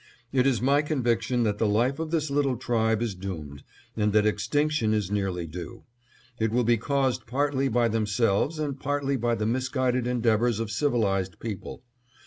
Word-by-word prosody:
It 130 0 +3
is 120 -4 +1
my 140 +2 +4
conviction 125 -4 0
that 105 -2 0
the 110 - +2
life 120 +7 +1
of 160 -1 -3
this 155 -3 -1
little 140 -3 +1
tribe 110 -2 +1
is 115 -4 -2
doomed, 80 -7 -7 0.3
and 105 -2 +1
that 105 0 +4
extinction 145 0 +1
is 105 -3 -2
nearly 95 -4 -1
due. 90 +8 -8 0.6
It 110 0 +1
will 120 +3 +1
be 120 0 +3
caused 135 +2 0
partly 135 +2 0
by 120 -1 +2
themselves, 110 +5 +1
and 145 -3 -3
partly 140 -1 -1
by 120 -1 0
the 105 - -2
misguided 130 +1 0
endeavors 120 -2 +1
of 115 -2 -3
civilized 100 - 0
people. 110 0 -6
120 Hz, 170 wpm, -26 LUFS, 105-135 Hz, 0.6 s, my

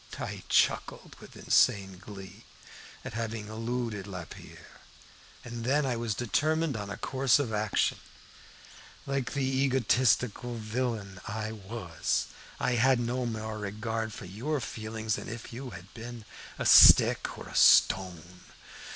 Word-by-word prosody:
"I - - -5
chuckled - - +1
with - - -14
insane 95 -2 +2
glee 95 +1 -11 0.6
at - - -6
having 110 -1 -4
eluded 115 -2 -4
Lapierre, 90 -4 -11 0.6
and 120 -1 -7
then 140 +4 +2
I 130 - 0
determined 130 +7 0
on 105 -2 -5
a 100 - -6
course 135 -1 +2
of 135 -6 -2
action. 105 -1 0 1.1
Like 135 -2 -2
the 140 -2 -1
egotistical 130 -2 +1
villain 110 -4 -4
I 110 0 -4
was, 100 -5 -3 0.3
I - - 0
had 130 0 +4
no 120 +1 -2
more 110 -1 -5
regard 110 +2 -3
for 100 - -9
your 125 +11 -3
feelings 110 -2 -4
than - - -7
if 115 0 -8
you 130 +2 -7
had 95 -2 -12
been 115 -1 -9 0.3
a - - -3
stick - - +7
or - - -9
a - - -10
stone. 90 -4 +5
115 Hz, 135 wpm, -29 LUFS, 105-125 Hz, 1.1 s, stick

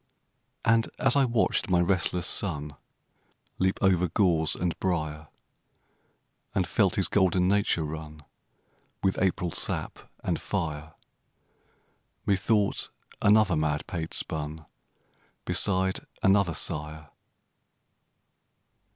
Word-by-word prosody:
And 115 0 +3
as 135 -1 +3
I 140 -1 +5
watched 115 -3 +1
my 90 -1 +3
restless 90 -1 +1
son 75 -8 -2 0.8
Leap 95 0 +1
over 90 -2 +3
gorse 85 -4 +2
and 90 -1 -1
briar, 80 -4 -2 1.3
And - - +2
felt - - +1
his - - +2
golden 95 -2 +2
nature 100 -4 +2
run 75 0 -7 0.8
With 95 -1 +1
April 90 -2 0
sap - - -1 0.2
and - - -1
fire, 75 0 -4 1.3
Methought 100 +1 +1 0.3
another 105 -2 +5
madpate 75 +2 -2
spun 75 0 -3 0.8
Beside 95 -1 +1 0.2
another 95 -4 +3
sire. 75 0 -5
90 Hz, 95 wpm, -27 LUFS, 80-100 Hz, 1.3 s, I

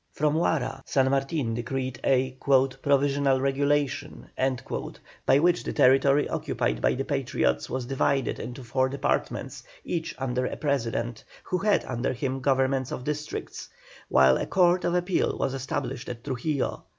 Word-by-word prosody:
From 150 0 +1
Huara 155 -5 0
San 130 -1 +2
Martin 135 -3 0
decreed 130 +2 -3
a 130 -1 +2
"Provisional 140 0 +2
Regulation," 140 +1 -1 1.0
by 135 - +6
which 175 +4 +3
the - - -4
territory 135 +2 +4
occupied - - -2
by - - +2
the - - -3
Patriots 60 0 0
was 130 0 -3
divided 135 -1 0
into 125 +3 -7
four 130 +2 +1
departments, 140 - -2 0.2
each 165 -1 -3
under 125 -1 -1
a - - -5
President, 120 -5 -2 0.2
who 180 - -2
had 205 +2 +2
under 125 +1 -2
him 130 +1 -2
governors 130 -1 +1
of 125 - -4
districts, 150 +2 -5 0.4
while 65 0 +5
a - - -3
Court 180 -1 +3
of 175 - +1
Appeal 180 +1 0
was 135 - -1
established 135 -2 -4
at 120 -1 -7
Trujillo. 140 +1 -2
135 Hz, 145 wpm, -26 LUFS, 125-145 Hz, 1.0 s, by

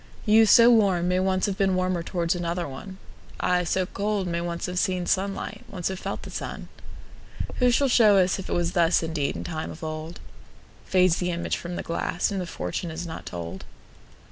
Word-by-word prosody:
You, 220 0 +6
so 235 +3 +8
warm, 195 -6 +3
may 180 0 +2
once 185 0 +1
have 195 -2 -2
beenWarmer 185 -2 +1
towards 170 -1 -1
another 175 0 -2
one:I, 180 +3 -4
so 185 +2 0
cold, 200 +1 -2
may 170 -1 -2
once 170 0 -3
have 180 0 -4
seenSunlight, 190 +4 -1
once 185 -4 -3
have 190 -1 -5
felt - - -5
the - - -8
sun:Who 250 -1 -5
shall 275 +3 +3
show 220 -5 +5
us 185 +1 +2
if 190 - -7
it - - -1
wasThus 170 0 +2
indeed 160 -3 -2
in - - -5
time 160 -2 -4
of 160 - -10
old? 155 +1 -5 0.7
Fades 185 -2 +4
the 180 - -1
image 170 -1 -1
from 175 +1 -6
the - - -4
glass, 170 +3 -1
And 195 -2 -2
the 180 - -5
fortune 90 - -4
is 160 +2 -5
not 160 -1 -7
told. 85 -1 -6
180 Hz, 185 wpm, -25 LUFS, 170-190 Hz, 0.7 s, so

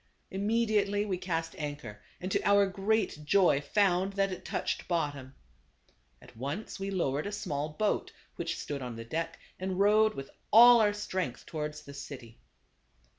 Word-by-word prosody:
Immediately 205 0 +1
we 185 -3 -2
cast 165 -3 -2
anchor, 145 -8 -6 0.2
and 185 +1 -5
to - - +1
our 200 0 +5
great 195 -4 0
joy 175 -3 +4
found 190 +3 +2
that 195 0 +1
it 185 0 -6
touched - - -3
bottom. 145 -6 -2 0.8
At - - -17
once 140 - -5
we 195 0 -3
low 175 -9 0
ered 150 +7 -2
a - - -4
small 150 -8 -3
boat 205 +7 -1 0.2
which - - -3
stood 145 -2 -5
on 125 -2 -5
the 115 0 -7
deck, 165 +6 -3 0.2
and 185 0 -3
rowed 215 +2 +4
with 135 0 -7 0.2
all 240 +1 +9
our 205 -1 +3
strength 185 -10 -3
towards 150 -1 -5
the 140 - -11
city. 125 -5 -9
185 Hz, 165 wpm, -30 LUFS, 145-205 Hz, 0.8 s, all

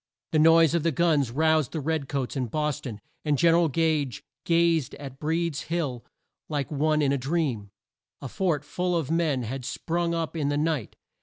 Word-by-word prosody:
The 155 - +2
noise 165 0 +6
of 170 - +2
the 165 +2 +1
guns 150 -5 +2
roused 155 +1 +2
the 160 - -2
red 150 -1 -2
coats 130 -3 -2
in 130 -3 -1
Bos 150 +3 -1
ton, 110 -7 -7 0.2
and 150 -2 +1
Gen 165 +4 +5
er - - +5
al 170 -1 +3
Gage 150 -5 0 0.2
gazed 165 -4 +2
at 135 -2 -9
Breed's 160 -1 -1
Hill 145 -8 -2 0.5
like 145 -2 -2
one 155 +1 +1
in 140 - +2
a 140 - 0
dream. 135 -7 -1 0.5
A 140 - -6
fort 155 -1 -1
full 180 +2 -1
of 160 -3 -2
men 160 -6 +1
had 125 +3 -5
sprung 170 +6 -2
up 165 0 -3
in 150 -3 0
the 145 - 0
night! 150 -7 -1
155 Hz, 200 wpm, -26 LUFS, 135-165 Hz, 0.5 s, noise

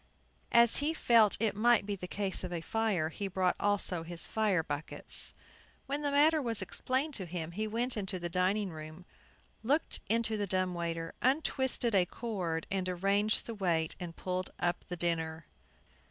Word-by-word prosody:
As 235 -1 +6
he 305 +3 +2
felt 230 -7 +5
it 215 -2 +1
might 230 0 +4
be 205 - -2
a 180 - -4
case 195 -1 -3
of 175 -2 -4
fire, 215 -8 0
he 200 +5 -4
brought 185 -1 +1
also 200 -4 +1
his 165 0 -6
fire 205 -6 +1
buckets. 145 0 0 0.5
When 285 +2 -2
the 290 - 0
matter 300 +2 +4
was 230 -5 -1
explained 260 +9 -2
to 190 -8 -2
him, 165 -1 -4
he 215 +5 -2
went 235 +4 -1
into 190 -3 -3
the 175 -1 -3
dining 185 +3 0
room, 155 +2 -9 0.6
looked 280 +8 0
into 225 0 +1
the 205 -1 -1
dumb 185 -1 +1
waiter, 165 -1 -3
untwisted 260 -3 +1
a 185 -3 +4
cord, 180 -9 -3
and 190 -1 -1
arranged 200 +4 +1
the 230 - -5
weight, 170 -6 0
and 170 -2 -6
pulled 185 0 -3
up 175 0 -1
the 180 - -6
dinner. 165 -2 -1
195 Hz, 170 wpm, -32 LUFS, 175-225 Hz, 0.6 s, As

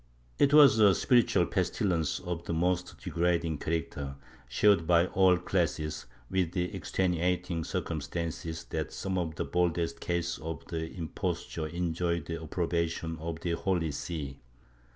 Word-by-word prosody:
It 140 - +5
was 145 -6 +8
a 100 -4 +7
spiritual 120 +2 +3
pestilence 85 -6 0
of 85 -1 -4
the 85 - -2
most 90 +2 0
degrading 85 -3 0
character, 70 -4 -3 0.3
shared 85 +5 +4
by 85 0 +5
all 95 -1 +4
classes, 85 -4 -1 0.2
with 90 0 0
the 90 -1 -1
extenuating 90 -1 0
circumstances 80 +2 -3
that - - -2
some 95 -1 -2
of 80 -3 -3
the - - -2
boldest 85 -1 0
cases 85 0 -2
of 80 -2 -6
impos 80 0 -4
ture 80 -2 -2
enjoyed 85 0 -1
the 85 -1 -5
approbation 85 0 -2
of 80 0 -5
the 85 - -1
Holy 85 -2 0
See. 70 -2 -5
85 Hz, 135 wpm, -30 LUFS, 80-90 Hz, 0.3 s, was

